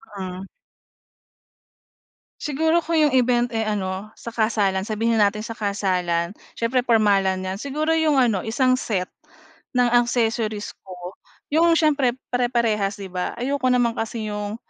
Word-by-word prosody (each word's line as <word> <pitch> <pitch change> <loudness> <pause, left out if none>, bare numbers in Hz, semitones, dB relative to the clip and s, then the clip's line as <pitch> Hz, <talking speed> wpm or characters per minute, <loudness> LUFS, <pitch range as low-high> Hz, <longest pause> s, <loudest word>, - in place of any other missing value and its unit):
Hmm. 185 -1 -6 2.0
Siguro 320 +3 +1
kung 335 0 -2
'yong 305 -3 +4
event, 245 0 +2
eh, 225 -1 -1
ano, 200 0 -3
sa 235 - -8
kasalan. 210 -4 0
Sabihin 225 +1 +1
na 205 - +6
natin 210 +1 -4
sa 230 - -6
kasalan, 185 -5 -1 0.2
siyempre 235 +2 +1
pormalan 195 -4 +3
'yan. 190 +1 -4
Siguro 300 +5 -1
'yong 320 -2 +3
ano 240 -7 +3
isang 255 +2 +2
set, 185 -7 -2 0.6
ng 250 -1 +4
accessories 230 -3 +1
ko, 180 0 -9 0.4
'yong 330 +2 +4
siyempre 285 -6 +2 0.2
pare-parehas 235 -5 +1
'di 190 -2 -7
ba? 180 -1 -3
Ayoko 260 +2 -1
naman 245 -2 +3
kasi 225 -1 -4
‘yong 210 0 -4
225 Hz, 140 wpm, -23 LUFS, 200-250 Hz, 2.0 s, na